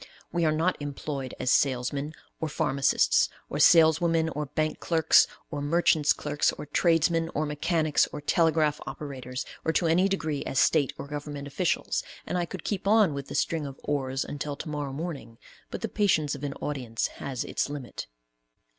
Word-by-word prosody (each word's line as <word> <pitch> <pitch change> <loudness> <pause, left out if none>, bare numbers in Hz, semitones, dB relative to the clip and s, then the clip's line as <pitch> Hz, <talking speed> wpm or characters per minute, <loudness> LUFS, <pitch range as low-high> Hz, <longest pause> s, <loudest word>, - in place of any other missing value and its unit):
We 170 -1 +1
are 155 - +3
not 165 +4 +1
employed 140 -2 -5
as 125 - +1
salesmen 140 +3 +1 0.3
or 160 - -2
pharmacists, 135 - +2 0.2
or - - -2
saleswomen, 165 0 +5
or 150 -2 -4
bank 155 +3 -2
clerks, 160 -2 +4 0.2
or 145 -2 -3
merchants' 155 0 +3
clerks, 145 0 +1
or - - -7
tradesmen, 165 +1 +2
or 155 - +1
mechanics, 155 0 +1
or - - -5
telegraph 155 0 +2
operators, 130 -3 -6 0.2
or 160 - +1
to 175 - +1
any 170 +4 +4
degree 155 -7 -2
as - - -3
State 150 -5 +3
or - - -6
government 145 -1 -6
officials, 165 +5 0 0.2
and - - -3
I 175 -1 +1
could - - -8
keep 195 -2 -3
on 210 -6 +5
with 140 -1 -5
the - - -7
string 160 -3 0
of 135 - -10
"ors" 135 -2 -1
until 145 0 -4
to 155 - -7
morrow 145 -2 -3
morning, 140 -6 -6 0.3
but - - -6
the - - -1
patience 155 -8 +1
of 140 -1 -7
an 140 -1 -2
audience 125 -6 -3 0.2
has 130 -3 -3
its - - -2
limit. 145 -4 -6
150 Hz, 175 wpm, -27 LUFS, 140-165 Hz, 0.3 s, saleswomen